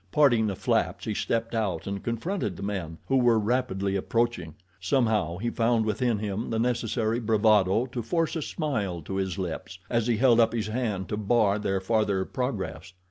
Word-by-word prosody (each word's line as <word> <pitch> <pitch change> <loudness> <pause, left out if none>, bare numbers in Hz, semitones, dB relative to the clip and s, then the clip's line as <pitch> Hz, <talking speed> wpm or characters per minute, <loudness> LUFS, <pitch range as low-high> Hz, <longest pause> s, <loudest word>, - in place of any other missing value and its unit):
Parting 120 -7 +4
the 100 - -2
flaps - - 0
he - - -1
stepped 115 0 -1
out 105 -7 -1
and 100 0 -4
confronted 115 - -2
the - - -7
men, 90 -5 -4
who 135 - +3
were 120 -3 +4
rapidly 105 -4 0
approaching. 115 -5 -1 0.2
Somehow 110 - +1
he 115 +5 -2
found 115 -1 +2
within 110 +2 0
him 105 +2 -3
the 115 - -1
necessary 115 -1 0
bravado 110 -1 +3
to 125 -1 -5
force 165 +7 -1
a 160 - -1
smile 105 - -2
to 95 +5 -4
his 95 -1 -2
lips, 95 +1 -5
as 115 -1 +1
he 120 -2 +2
held 120 -1 +5
up 115 0 +4
his 110 -2 -2
hand 110 -5 -2
to 105 - -2
bar 105 -1 +2
their 95 -2 0
farther 100 -1 +1
progress. 95 - -4
110 Hz, 185 wpm, -27 LUFS, 95-120 Hz, 0.2 s, held